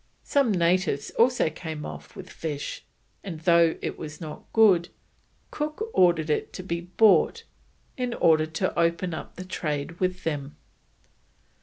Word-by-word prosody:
Some 275 -5 +2
natives 175 -5 +1
also 240 -8 +3
came 155 -1 -6
off - - -9
with 190 -2 -9
fish, 150 -3 -5 0.4
and 165 -5 -7
though 170 -1 +4
it - - -4
was 150 -1 -7
not 155 -3 -9
good, 190 -6 +5 0.6
Cook 310 +10 -4
ordered 170 -4 +3
it - - -1
to 185 - -6
be 170 -2 -3
bought, 195 - +3 0.5
in 250 -2 -2
order 155 -1 +4
to 165 +4 -2
open 170 +1 +1
up - - -8
trade 150 -1 -3
with 185 0 -1
them. 145 -3 -3
170 Hz, 140 wpm, -26 LUFS, 160-190 Hz, 0.6 s, good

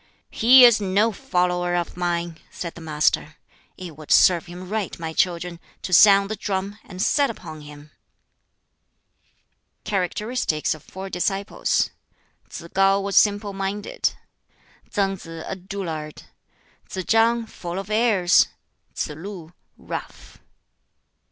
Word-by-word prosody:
"He 250 +3 +8
is 235 -3 +5
no 200 +3 +2
follower 180 -7 0
of 175 -1 -2
mine," 170 -2 -2
said 170 -2 -6
the 170 - -12
Master. 155 0 0 0.4
"It 175 -4 -8
would 155 0 -13
serve 175 -2 +5
him 180 +1 -9
right, 210 -1 -3
my 160 -1 -5
children, 175 0 -1 0.2
to 185 - -4
sound 200 +2 +7
the - - -1
drum, 200 0 -3
and 185 -2 -11
set 280 +7 +2
upon 160 -8 -8
him." 150 0 -13 1.9
Characteristics 200 -3 -1
of 155 - -11
four 190 +1 -9
disciples: 195 +3 0 0.6
Tsz - - -8
kŠu 195 +1 +3
was 200 0 -3
simple 205 -1 +3
minded; 195 +1 -2 0.8
Tsang 195 -1 0
Si, - - -12 0.2
a - - -4
dullard; 175 -5 -6 0.7
Tsz 185 -2 -5
chang, 230 +1 +3
full 175 -4 -7
of 195 +2 -6
airs; 210 -5 +4 0.5
Tsz - - -2
lu, 170 +2 -9 0.2
rough. - - -8
190 Hz, 125 wpm, -23 LUFS, 170-205 Hz, 1.9 s, He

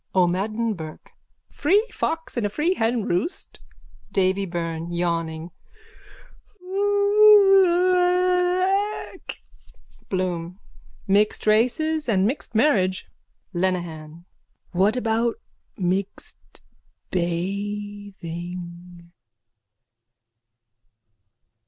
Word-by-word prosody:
O'MADDEN 205 +6 +1
BURKE: 160 -4 -10 0.4
Free 415 +4 +2
fox 325 0 -3
in 240 - -1
a 205 - 0
free 305 - 0
henroost. 225 - -2 0.5
DAVY 195 +1 +1
BYRNE: 165 -1 -4
(Yawning.) 170 -1 -2 1.1
Iiiiiiiiiaaaaaaach! 380 -1 +3 0.7
BLOOM: 180 -1 -3 0.5
Mixed 205 +2 +2
races 255 +8 +1
and 190 -3 +3
mixed 240 0 -3
marriage. 200 -7 +2 0.5
LENEHAN: 170 -3 -3 0.5
What 195 +5 +2
about 230 0 0 0.4
mixed 190 +1 -4 0.5
bathing? 180 -2 -5
205 Hz, 65 wpm, -23 LUFS, -, 1.1 s, Iiiiiiiiiaaaaaaach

